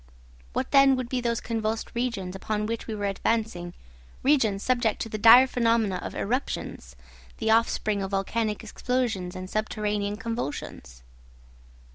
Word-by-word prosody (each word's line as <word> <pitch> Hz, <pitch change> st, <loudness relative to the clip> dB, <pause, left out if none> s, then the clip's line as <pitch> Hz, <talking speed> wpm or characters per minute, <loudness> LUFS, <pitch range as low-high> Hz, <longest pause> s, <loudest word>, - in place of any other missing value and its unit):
What -, -, -2 dB
then 275 Hz, -1 st, +6 dB
would 255 Hz, -2 st, -4 dB
be 255 Hz, -1 st, -1 dB
those 235 Hz, -1 st, 0 dB
convulsed 225 Hz, -1 st, -3 dB
regions 230 Hz, -7 st, -2 dB
upon 210 Hz, +2 st, -2 dB
which 230 Hz, +1 st, -4 dB
we 220 Hz, -, -3 dB
were 205 Hz, -1 st, -3 dB
advancing, 195 Hz, -3 st, -1 dB, 0.5 s
regions 235 Hz, -8 st, +2 dB
subject 240 Hz, -4 st, +1 dB
to 225 Hz, -, -7 dB
the 215 Hz, -, -4 dB
dire 230 Hz, +4 st, +9 dB
phenomena 230 Hz, -6 st, +1 dB
of -, -, -6 dB
eruptions, 250 Hz, +6 st, -3 dB, 0.4 s
the 220 Hz, -1 st, 0 dB
offspring 220 Hz, -2 st, +2 dB
of 195 Hz, -, -3 dB
volcanic 210 Hz, +3 st, -1 dB
explosions 220 Hz, -5 st, -2 dB
and 185 Hz, 0 st, -6 dB
subterranean 210 Hz, 0 st, -2 dB
convulsions? 145 Hz, -, -5 dB
220 Hz, 140 wpm, -26 LUFS, 200-235 Hz, 0.5 s, dire